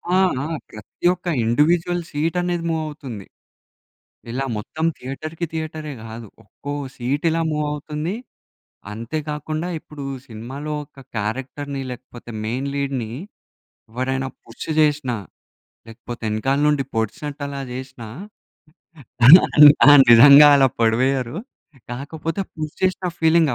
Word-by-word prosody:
ఆ! - - +5 0.3
ఆ! - - -3 0.2
ప్రతి 110 - -10
ఒక్క 180 0 -11 0.2
ఇండివిడ్యువల్ 170 +8 +2
సీట్ 160 +4 -2
అనేది 175 -1 -2
మూవ్ 160 -1 -1
అవుతుంది. 130 -10 -8 1.1
ఇలా 135 +3 -2
మొత్తం 155 +10 -4
థియేటర్‌కి, 155 +6 -5
థియేటరే 155 -2 -5
గాదు 115 0 -9 0.2
ఒక్కో 145 +6 -8 0.2
సీట్ 135 +3 -2
ఇలా 165 +1 0
మూవ్ 150 0 -1
అవుతుంది. 150 +4 -4 0.8
అంతే 115 +8 -4
కాకుండా, 155 +3 -3
ఇప్పుడు 150 -2 -10 0.2
సినిమాలో 130 +7 -6
ఒక 135 - -19 0.2
క్యారెక్టర్‌ని, 135 +6 -4
లేకపోతే 120 -1 -10
మెయిన్ 130 +5 -2
లీడ్‌ని 135 -5 -2 0.8
ఎవరైనా 130 +2 -2 0.2
పుష్ 115 +6 -9
జేసినా, 145 -6 +1 0.7
లేకపోతే 120 +2 -9
ఎనకాల 130 +6 0
నుండి 145 -2 +2
పొడిచినట్టు 140 +7 -3
అలా 140 -1 -5
జేసినా 130 -2 -8 1.2
అలా 165 +8 +11 0.4
ఆ - - +10 0.2
నిజంగా 140 +5 +9
అలా 135 - +5
పొడివేయ్యరు 125 - +1 0.5
కాకపోతే, 155 +7 -4
పుష్ 155 -1 -6
జేసిన 185 0 0
ఫీలింగ్ 160 -1 +4
140 Hz, 115 wpm, -21 LUFS, 120-155 Hz, 1.2 s, అలా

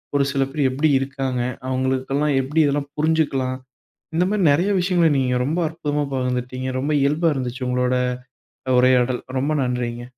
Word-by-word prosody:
ஒரு 140 -1 +3
சில 135 -1 +1
பேர் 140 -2 +1
எப்படி 145 +4 +1
இருக்காங்க, 135 -2 -3 0.3
அவங்களுக்கு 130 0 -1
எல்லாம் 150 0 +1
எப்படி 145 +5 -1
இதெல்லாம் 140 0 -1
புரிஞ்சுக்கலாம். 145 -5 0 0.6
இந்த 175 +2 +2
மாதிரி 205 0 0
நிறைய 175 +8 +1
விஷயங்களை 175 -2 +3
நீங்க 125 -1 +1
ரொம்ப 160 +6 -1
அற்புதமா 150 -2 -2
பகிர்ந்துக்கிட்டீங்க. 130 0 -2
ரொம்ப 145 +4 -1
இயல்பா 150 +4 +2
இருந்துச்சு 130 0 -4
உங்களோட 125 0 +1 0.8
உரையாடல். 125 0 +3 0.2
ரொம்ப 140 +4 0
நன்றிங்க. 120 -1 -3
135 Hz, 145 wpm, -21 LUFS, 130-150 Hz, 0.8 s, ஒரு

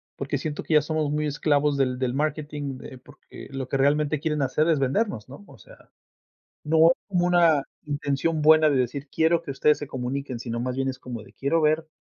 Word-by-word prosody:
porque 140 +1 -3
siento 150 +2 -4
que - - -2
ya 150 - +6
somos 155 -1 -1
muy 150 +1 -1
esclavos 145 -1 +1
del 130 -2 0
del 125 -1 -1
marketing, 145 -2 -3
eh, 130 - -10
porque - - -14
lo 135 -1 -5
que 135 - -1
realmente 145 +2 +2
quieren 150 -1 -1
hacer 150 +4 +1
es 165 -2 +3
vendernos, 135 - -1
¿no?, 140 +9 -11
o - - -15
sea, - - -18 0.7
no 160 +2 +5
como 180 -3 +1
una 170 -4 +4 0.2
intención 145 +2 -1
buena 155 0 +6
de - - +1
decir 130 +3 -2
quiero 165 +2 +2
que 150 - -5
ustedes 150 +2 +2
se 145 - -7
comuniquen, 130 0 -4
sino 115 -1 -4
más 125 +1 -3
bien 135 0 -1
es 130 - -5
como 125 -3 -7
de, - - -16
quiero 160 +4 0
ver 155 +1 +1
145 Hz, 210 wpm, -25 LUFS, 135-155 Hz, 0.7 s, ya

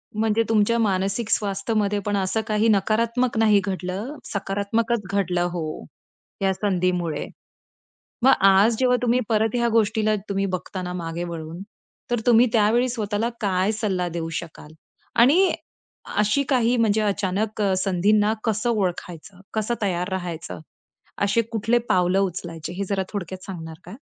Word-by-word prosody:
म्हणजे 220 +1 +2
तुमच्या 220 +1 +3
मानसिक 200 +2 0
स्वास्थ्यमध्ये 205 0 0
पण 205 -1 0
असं 195 +3 0
काही 215 0 +2
नकारात्मक 230 +4 +1
नाही 215 -2 +5
घडलं, 195 +7 -4
सकारात्मकच 205 +3 -1
घडलं, 180 -3 0
हो, 155 - -5 0.6
या 195 0 +2
संधीमुळे. 180 -5 -1 1.0
मग 265 - +7 0.2
आज 200 +4 +5
जेव्हा 250 -1 +3
तुम्ही 245 +1 +2
परत 220 0 +1
ह्या 235 -1 +2
गोष्टीला 215 -1 +2
तुम्ही 195 0 0
बघता 185 +1 -7
ना 180 - -4
मागे 170 -1 -4
वळून, 165 +1 -6 0.5
तर 240 -2 +1
तुम्ही 240 0 +6
त्यावेळी 230 +3 +3
स्वतःला 220 -2 -1
काय 195 0 +1
सल्ला 195 -5 -1
देऊ 165 -1 -4
शकाल? 155 -2 -12 0.4
आणि 305 +11 +5 0.6
अशी 210 +7 +2
काही 250 -2 +2
म्हणजे 220 -2 +2
अचानक 205 +1 -1
अ, 195 -2 +2
संधींना 205 +3 +2
कसं 225 +2 0
ओळखायचं? 180 -3 -3
कसं 220 +2 0
तयार 180 -2 0
राहायचं? 175 -4 -5 0.6
असे 200 +3 +2
कुठले 225 +2 +2
पावलं 180 +1 +3
उचलायचे 170 -3 -4
हे 200 +2 -2
जरा 195 -1 0
थोडक्यात 185 -2 -5
सांगणार 160 -4 -7
का? - - -9
205 Hz, 140 wpm, -23 LUFS, 185-225 Hz, 1.0 s, मग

